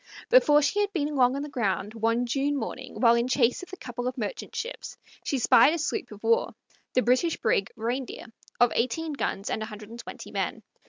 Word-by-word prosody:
Before 300 -12 +6
she 390 +8 +1
had 405 -1 0
been 300 -4 -1
long 255 -1 +4
on 280 - -3
the - - -5
ground, 205 - -2
one 230 +2 +1
June 280 +4 0
morning, 230 - -6
while 235 -2 +6
in 235 +1 +1
chase 255 +1 +2
of 365 - -11
a 375 - -7
couple 245 -3 -5
of 255 +1 -3
merchant 210 -4 -5
ships, - - -5 0.3
she 275 - -1
spied 285 +5 +5
a - - -2
sloop 310 - -2
of 210 0 -12
war, 230 0 +2 0.4
the 255 - +4
British 255 +7 +2
brig 200 -3 +1
Reindeer, 240 +3 -4 0.3
of 245 -1 +5
eighteen 300 +7 -1
guns 200 -7 -3
and - - -2
a 215 - -3
hundred 210 0 -10
and 235 - -9
twenty - - -9
men. - - -3
245 Hz, 215 wpm, -27 LUFS, 230-290 Hz, 0.4 s, Before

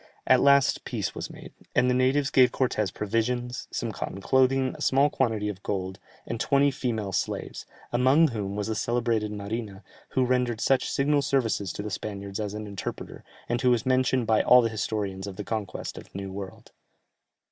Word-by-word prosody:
At 130 -1 +5
last 140 -1 +4
peace - - -3
was - - -5
made, - - -12 0.2
and 125 - +4
the 125 - +3
natives 130 +3 +2
gave 125 -2 +5
Cortès 110 -6 0
provisions, 120 +4 -2
some 115 - -3
cotton 95 - -5
clothing, 130 +4 +2
a - - -11
small 140 +2 +3
quantity 110 -5 0
of 100 -2 -5
gold, 95 -2 -3 0.3
and 115 - -4
twenty 140 +3 +3
female 115 -7 -2
slaves, 90 - -3 0.3
among 130 +6 +4
whom 100 -4 -4
was 105 0 -2
the 110 - -2
celebrated 115 -1 0
Marina, 105 -1 -5 0.3
who 130 - +4
rendered 125 -2 0
such 135 +2 +2
signal 145 +1 +2
services 115 -8 0
to 100 - -5
the 105 - -5
Spaniards 100 0 -5
as 105 -1 -3
an 105 0 -5
interpreter, 100 -3 -6 0.2
and 120 0 -1
who 125 - +4
is 120 - -4
mentioned 130 -1 +2
by 110 -1 +3
all 125 0 +6
the 115 - +1
historians 100 -3 -3
of 100 - -7
the 105 - -5
conquest 105 -3 -4
of - - -12
the - - -11
New 100 -1 -5
World. 95 0 -8
115 Hz, 190 wpm, -27 LUFS, 105-130 Hz, 0.3 s, all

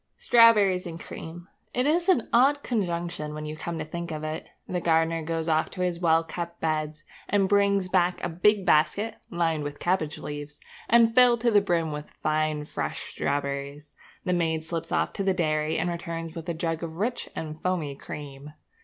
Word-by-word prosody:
Strawberries 210 -6 +5
and 165 -1 -7
cream! 170 +2 -8 0.3
It 250 - +2
is 340 +5 +2
an 265 -11 +3
odd 275 +4 +4
conjunction 170 -8 -2
when 155 0 -5
you 155 0 -5
come 165 +2 -5
to 155 - -4
think 170 +2 -5
of 155 -1 -5
it. 155 +1 -5 0.2
The 180 -1 -2
gardener 165 0 +2
goes 165 +1 -3
off 155 -1 +2
to 185 - -6
his 180 -2 0
well 165 -2 +3
kept 170 +1 -6
beds 155 -1 -2 0.3
and 200 -2 +3
brings 200 -1 +3
back 180 -1 +2
a - - +1
big 190 +4 +2
basket, 205 +7 +2
lined 165 -3 0
with 145 0 -6
cabbage 170 -4 0
leaves, 145 0 -7 0.3
and 230 0 +5
filled 245 -2 +6
to 235 0 +3
the 205 -1 +5
brim 170 -5 0
with 150 0 -6
fine 155 -1 0
fresh - - -4
strawberries. 140 +1 -3 0.3
The 180 - +1
maid 160 -2 0
slips 165 0 -5
off - - 0
to 200 - -2
the 190 -1 +1
dairy 155 -2 0
and - - 0
returns 165 -1 -4
with 165 +1 -7
a 170 - -2
jug 165 0 -2
of 165 -1 -6
rich 235 +6 -2
and 155 -1 -6
foamy 170 -6 -1
cream. 145 +1 -9
170 Hz, 190 wpm, -26 LUFS, 155-190 Hz, 0.3 s, filled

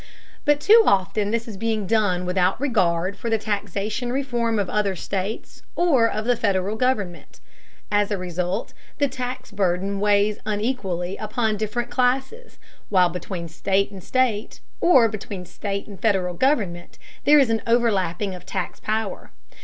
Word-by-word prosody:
But 295 -1 +4
too 435 +9 +7
often 200 +2 +2
this 230 +1 -1
is 215 -4 -7
being 220 -1 -1
done 190 -4 +1
without 180 +1 +1
regard 185 -8 +1
for 230 - -4
the 225 - +2
taxation 210 +3 -3
reform 240 -4 0
of 200 -2 0
other 205 -1 0
states 195 +4 -4
or 270 -10 +3
of 215 +1 -3
the 245 0 +3
Federal 200 -2 0
government. 215 -8 -2 0.5
As 205 -1 +2
a 205 - -1
result, 180 +3 -3 0.2
the 285 - +2
tax 255 -1 -5
burden 195 0 0
weighs 205 0 +2
unequally 205 -4 -2
upon 220 0 -1
different 220 +3 -3
classes, 265 - -1 0.3
while 185 -3 +4
between 175 0 -5
state 195 +4 0
and 190 -3 -10
state, 245 -5 0 0.2
or 260 -10 +6
between 200 -3 -6
state 200 +2 -4
and 200 -3 -11
Federal 190 -5 +1
government, 185 - 0 0.3
there 300 +1 +7
is 270 -5 +4
an 225 - +1
overlapping 205 -5 +1
of 180 - -9
tax 185 -2 -4
power. 215 -2 -3
210 Hz, 155 wpm, -23 LUFS, 190-235 Hz, 0.5 s, too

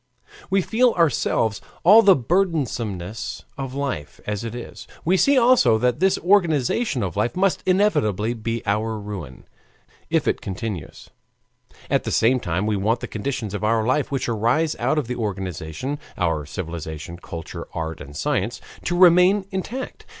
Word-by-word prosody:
We 195 -1 +2
feel 240 +4 +3
ourselves 120 - +1 0.2
all 210 +6 +8
the 200 -4 +6
burdensomeness 115 - -2
of 135 -1 -5
life 140 - -4
as 105 0 -3
it 115 0 -5
is; 120 - -9 0.2
we 180 +3 +3
see 275 +8 +4
also 245 - +5
that 125 +1 +1
this 190 0 +3
organization 170 - +2
of 90 -4 -3
life 105 +4 0
must 190 0 +1
inevitably 120 - +2
be 115 0 -4
our 110 +2 0
ruin, 100 -11 -7 0.7
if - - +1
it - - 0
continues. 95 -2 -6 0.8
At - - +1
the - - -3
same 125 +3 +3
time 90 -1 -2
we 105 -1 0
want 110 +5 0
the - - -4
conditions 110 -2 -4
of 105 - -4
our 110 0 +2
life 135 +4 +1
which 135 -2 -1
arise 120 +8 +1
out 155 - +1
of 150 - 0
this 125 - -3
organization 95 - -4 0.2
our 80 -5 0
civilization, 80 -1 -6
culture, 85 -2 -8
art, 80 -1 -4
and 70 +1 -9
science 120 -7 -1 0.3
to 175 - 0
remain 180 +2 +6
intact. 230 +7 -5
115 Hz, 155 wpm, -23 LUFS, 100-170 Hz, 0.8 s, all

